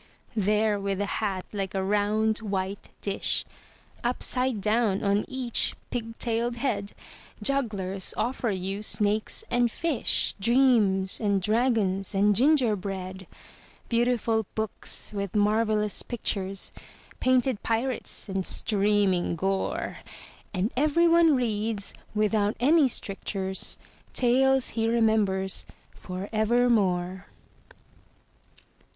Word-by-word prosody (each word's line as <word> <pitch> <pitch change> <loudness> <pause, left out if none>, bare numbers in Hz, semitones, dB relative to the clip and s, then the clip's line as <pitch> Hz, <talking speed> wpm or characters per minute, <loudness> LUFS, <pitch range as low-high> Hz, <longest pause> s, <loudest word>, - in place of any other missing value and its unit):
There 210 0 +1
with 195 -1 -2
a 205 - 0 0.2
hat 195 -4 -2
like 195 -1 -3
a 190 - 0
round, 210 +2 +1
white 195 -2 -4
dish 200 -1 -1 0.6
Upside 250 -1 0
down 210 -1 +1
on 200 +1 +1
each 255 -3 0 0.2
pig 230 -2 -4
tailed 235 0 -1
head, 235 -5 -2 0.5
Jugglers 205 -8 +1
offer 245 -1 -1
you 195 +1 -3
snakes 215 0 +1
and 245 0 +3
fish, 305 +1 +1
Dreams 215 -5 +3
and 200 -3 +1
dragons 210 -2 0
and 205 +1 +3
gingerbread; 195 - 0 0.6
Beautiful 230 -2 +1
books 220 0 -3
with 200 -1 -4
marvellous 210 0 +2
pictures, 195 -5 -2 0.5
Painted 255 -3 +2
pirates 230 +2 -3
and 190 -1 -2
streaming 200 -4 +1
gore, 195 +3 -2 0.5
And 195 +3 -1
everyone 330 +3 +4
reads, 220 -4 -2 0.2
without 210 0 +1
any 290 +4 +5
strictures, 195 -4 -1 0.4
Tales 265 +1 +3
he 225 -1 -1
remembers 215 -5 +2 0.3
for 185 +2 -6
evermore. 210 -5 +1
215 Hz, 100 wpm, -26 LUFS, 195-240 Hz, 0.6 s, any